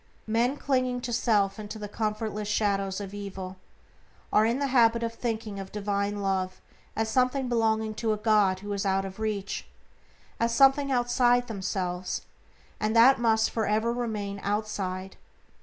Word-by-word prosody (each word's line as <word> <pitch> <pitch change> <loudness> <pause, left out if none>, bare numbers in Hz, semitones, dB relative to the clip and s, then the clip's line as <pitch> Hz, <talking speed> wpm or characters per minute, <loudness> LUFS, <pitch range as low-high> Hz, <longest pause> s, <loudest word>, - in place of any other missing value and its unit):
Men, 235 +5 +1
clinging 255 -3 0
to 240 -1 -4
self 210 -4 +2
and 210 -1 -7
to 220 - -6
the 210 -1 -6
comfortless 215 0 -3
shadows 200 -2 0
of 200 -1 -7
evil, 190 -2 -6 0.8
are 215 +1 +5
in 235 +2 +1
the 280 - 0
habit 235 -2 +4
of 230 0 -2
thinking 220 -4 -3
of 195 -1 -7
divine 205 0 -2
Love 185 -1 -1 0.4
as 225 0 0
something 255 +3 +1
belonging 220 -2 +1
to 220 +1 -1
a 215 - 0
God 210 -3 +3
who 205 0 -4
is 200 - -2
out 195 -1 +1
of 195 +2 -8
reach; 210 -2 -3 0.7
as 230 0 +1
something 275 +1 +5
outside 245 0 +3
themselves, 185 -4 -3 0.6
and 215 +1 0
that 250 +3 +7
must 220 -2 +2
for 220 -2 -1
ever 220 +3 +1
remain 210 -5 -3
outside. 195 -2 -3
215 Hz, 160 wpm, -27 LUFS, 200-235 Hz, 0.8 s, that